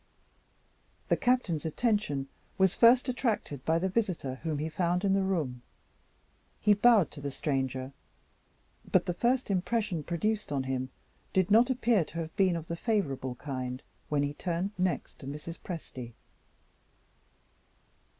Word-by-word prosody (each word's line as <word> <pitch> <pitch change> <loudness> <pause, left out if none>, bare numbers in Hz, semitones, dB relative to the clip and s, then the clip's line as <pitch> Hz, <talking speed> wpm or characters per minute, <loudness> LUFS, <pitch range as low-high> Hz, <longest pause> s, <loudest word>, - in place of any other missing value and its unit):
The - - +5
Captain's 245 - +1
attention 165 - 0 0.3
was 190 -2 +4
first 245 +3 +6
attracted 225 - -1
by 160 +1 +3
the 185 +3 0
visitor 180 - -1
whom 160 -3 -2
he 150 +2 -2
found 175 +3 0
in 195 - +3
the 195 - +3
room. 155 -11 -1 1.0
He 210 - +5
bowed 205 -4 +5
to 145 - -9
the 140 - -3
stranger; 135 -1 -2 1.0
but - - +4
the 175 - -1
first 245 +4 +1
impression 195 -2 0
produced 210 +5 -1
on 135 -2 0
him 130 0 -2 0.4
did 190 +1 +2
not 235 +4 +6
appear 235 -6 +3
to 165 - -10
have 165 -1 -4
been 190 -3 +3
of 165 -2 -4
the 170 - -4
favorable 140 - -1
kind, 130 0 -5 0.3
when 145 -1 +2
he 145 0 -1
turned 175 +4 -2
next 185 -1 -2
to 135 - -9
Mrs. 150 +4 -7
Presty. 130 -9 -7
170 Hz, 145 wpm, -30 LUFS, 140-205 Hz, 1.0 s, first